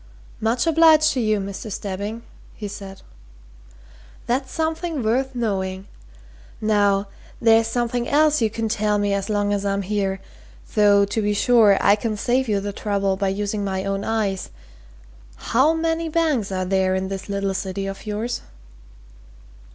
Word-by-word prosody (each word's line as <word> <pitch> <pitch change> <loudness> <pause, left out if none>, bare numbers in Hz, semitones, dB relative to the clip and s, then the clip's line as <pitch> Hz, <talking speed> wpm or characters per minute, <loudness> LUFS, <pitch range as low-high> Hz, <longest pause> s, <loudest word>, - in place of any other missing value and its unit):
"Much 230 +2 0
obliged 320 -1 +5
to 260 - -1
you, 215 -3 +1
Mr. 200 +2 -6
Stebbing," 205 +4 -5 0.3
he 210 - -6
said. 195 -1 -9 1.2
"That's 260 +3 -1
something 320 -3 -2
worth 255 +4 0
knowing. 190 -5 -2 0.7
Now 205 -2 +2 0.3
there's 225 0 +4
something 240 +1 -1
else 300 -1 +3
you 220 - +2
can 225 +1 -3
tell 210 -1 0
me 205 -1 0
as 200 +1 -2
long 205 -1 +1
as 200 -1 -1
I'm 200 0 -1
here 195 -1 -1 0.5
though, 205 -1 +5
to 210 +2 -2
be 205 0 0
sure, 220 -3 +5
I 200 - +5
could 215 0 -3
save 255 +4 +1
you 205 -2 +2
the 200 0 -4
trouble 200 -1 -1
by 195 +1 -1
using 205 +2 -2
my 190 -1 -2
own 195 0 -2
eyes. 210 -4 -1 0.9
How 275 +8 +2
many 325 0 -1
banks 305 -11 0
are 185 -1 -1
there 190 0 +1
in 190 0 -2
this 195 +1 -6
little 200 -1 -1
city 195 0 -3
of 195 +2 -7
yours?" 220 +3 -3
210 Hz, 155 wpm, -22 LUFS, 195-240 Hz, 1.2 s, obliged